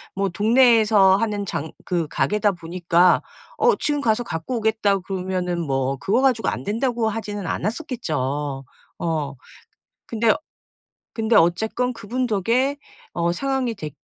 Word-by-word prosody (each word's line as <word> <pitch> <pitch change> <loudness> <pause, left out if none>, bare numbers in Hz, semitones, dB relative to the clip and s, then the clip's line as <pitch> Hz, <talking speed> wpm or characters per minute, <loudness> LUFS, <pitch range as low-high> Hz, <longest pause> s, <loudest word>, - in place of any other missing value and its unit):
뭐 195 0 0
동네에서 215 -2 +5
하는 205 -1 -1
장 160 -4 -4
그 170 -3 -1
가게다 210 +5 +1
보니까 175 0 +2 0.4
어 470 -1 +4
지금 295 -6 -1
가서 230 -1 +1
갖고 165 +5 -4
오겠다고 215 -3 +1
그러면은 185 -2 -3
뭐 135 -3 -1
그거 200 - +1
가지고 255 -4 +2
안 - - -2
된다고 230 +2 0
하지는 205 -2 -5
않았었겠죠. 150 - -3 0.4
어. 155 -4 -2 0.7
근데 230 -1 +2 0.8
근데 225 0 +1
어쨌건 220 +8 +2
그분 245 +2 -3
덕에 240 +6 +1 0.4
어 170 0 0
상황이 265 +3 -1
되 155 -6 -6
205 Hz, 280 characters per minute, -22 LUFS, 175-230 Hz, 0.8 s, 동네에서